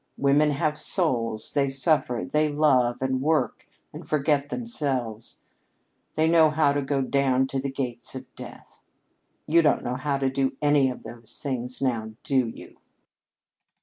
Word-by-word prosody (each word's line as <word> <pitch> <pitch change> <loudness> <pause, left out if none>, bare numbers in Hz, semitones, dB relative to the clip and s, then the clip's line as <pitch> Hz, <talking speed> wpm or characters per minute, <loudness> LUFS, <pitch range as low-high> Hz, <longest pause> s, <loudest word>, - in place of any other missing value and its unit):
Women 145 +2 +3
have 150 +1 -1
souls; 115 - 0
they 140 -2 +1
suffer; 135 - +1
they 150 +8 +1
love 135 -5 +2
and 130 0 0
work 150 -5 0 0.3
and - - -8
forget 145 -1 0
themselves; 135 - -3 0.7
they 160 +1 +2
know 160 -1 +5
how 150 -2 +2
to 145 - 0
go 135 0 -1
down 135 -1 +2
to 135 - -2
the 135 +1 -3
gates 125 -3 -4
of 130 0 -7
death. - - -12 0.7
You 170 +2 +4
don't 150 -3 +2
know 125 +1 -3
how 140 +1 -1
to 135 -1 0
do 135 0 -1
any 145 -2 +3
of 125 - -7
those 115 -1 -9
things, 130 -1 -4
now, 110 -4 -1
do 130 -4 +1
you?" 115 - -11
135 Hz, 155 wpm, -25 LUFS, 125-150 Hz, 0.7 s, know